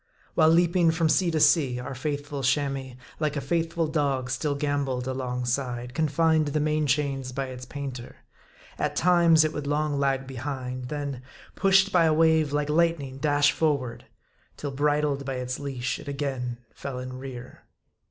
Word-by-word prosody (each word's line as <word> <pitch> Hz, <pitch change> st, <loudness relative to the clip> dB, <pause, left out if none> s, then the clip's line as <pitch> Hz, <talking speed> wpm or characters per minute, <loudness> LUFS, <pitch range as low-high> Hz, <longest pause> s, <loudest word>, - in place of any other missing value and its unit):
While 155 Hz, -, +5 dB
leaping 170 Hz, +1 st, +4 dB
from 160 Hz, 0 st, +2 dB
sea 175 Hz, +3 st, +3 dB
to 160 Hz, -1 st, 0 dB
sea, 135 Hz, -6 st, +4 dB
our 125 Hz, +2 st, -6 dB
faithful 145 Hz, +1 st, -4 dB
Chamois, 135 Hz, -1 st, -1 dB, 0.2 s
like 155 Hz, -2 st, 0 dB
a -, -, 0 dB
faithful 165 Hz, +1 st, -1 dB
dog, 140 Hz, -5 st, -1 dB
still 145 Hz, +3 st, -1 dB
gamboled 140 Hz, -3 st, -1 dB
alongside, 125 Hz, -1 st, -2 dB
confined 160 Hz, +1 st, +2 dB
to -, -, -2 dB
the 155 Hz, -, 0 dB
main 155 Hz, 0 st, +1 dB
chains 135 Hz, -1 st, 0 dB
by 135 Hz, +1 st, -3 dB
its 130 Hz, 0 st, -8 dB
paint 140 Hz, -3 st, -5 dB
er. 120 Hz, -, -11 dB, 0.6 s
At -, -, -1 dB
times, 170 Hz, -2 st, +5 dB
it 155 Hz, 0 st, -1 dB
would 150 Hz, -1 st, -4 dB
long 145 Hz, 0 st, 0 dB
lag 135 Hz, -1 st, +1 dB
behind; 130 Hz, -1 st, -5 dB
then, 140 Hz, -4 st, -4 dB, 0.3 s
pushed 195 Hz, 0 st, +4 dB
by 175 Hz, -3 st, +4 dB
a 160 Hz, -, +4 dB
wave 160 Hz, -2 st, +3 dB
like 145 Hz, 0 st, 0 dB
lightning 155 Hz, -5 st, +1 dB
dash 145 Hz, 0 st, +3 dB
forward; 140 Hz, -7 st, -1 dB, 0.5 s
till 145 Hz, -, -4 dB
bridled 145 Hz, 0 st, +1 dB
by 135 Hz, -1 st, -3 dB
its 125 Hz, 0 st, -4 dB
leash, 135 Hz, -3 st, -3 dB
it -, -, -11 dB
again 135 Hz, -4 st, -3 dB, 0.2 s
fell 140 Hz, -2 st, -6 dB
in 130 Hz, 0 st, -6 dB
rear. 130 Hz, -2 st, -9 dB
140 Hz, 170 wpm, -26 LUFS, 130-155 Hz, 0.6 s, While